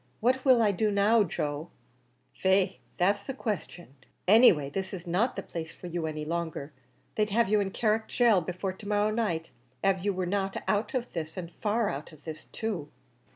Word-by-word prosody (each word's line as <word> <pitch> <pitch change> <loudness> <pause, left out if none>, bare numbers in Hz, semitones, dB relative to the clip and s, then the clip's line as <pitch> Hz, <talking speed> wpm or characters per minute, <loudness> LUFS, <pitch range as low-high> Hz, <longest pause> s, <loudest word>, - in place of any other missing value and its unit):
What 255 +3 +2
will 255 -4 +6
I 210 - +4
do 210 +3 +1
now, 210 +2 +4
Joe?" 150 -2 -3 0.6
"Faix, 190 0 +2 0.2
that's 200 +3 +2
the 270 - -5
question; 180 - -4 0.3
any 225 +6 +9
way, 150 -5 -2
this 190 +7 -4
is 180 -1 -9
not 190 +9 +1
the - - -4
place 160 -2 -6
for - - -12
you 170 -2 -2
any 155 -1 -4
longer; 160 -3 -3 0.4
they'd 210 -1 +1
have 225 0 +2
you 210 0 +4
in 200 -1 0
Carrick 220 +2 0
Gaol 230 -6 +5
before 185 +2 -3
to 200 +2 -11
morrow 210 +1 +2
night, 175 -8 -1 0.3
av 195 -1 +3
you 205 - +2
were 185 -1 -2
not 195 +1 -1
out 215 +6 0
of 245 -1 -2
this, 160 0 -5
an' 175 -2 -5
far 215 +1 +1
out 140 +4 -6
of 155 -2 -17
this 155 -1 -8
too." 200 -10 -4
195 Hz, 200 wpm, -29 LUFS, 170-215 Hz, 0.6 s, any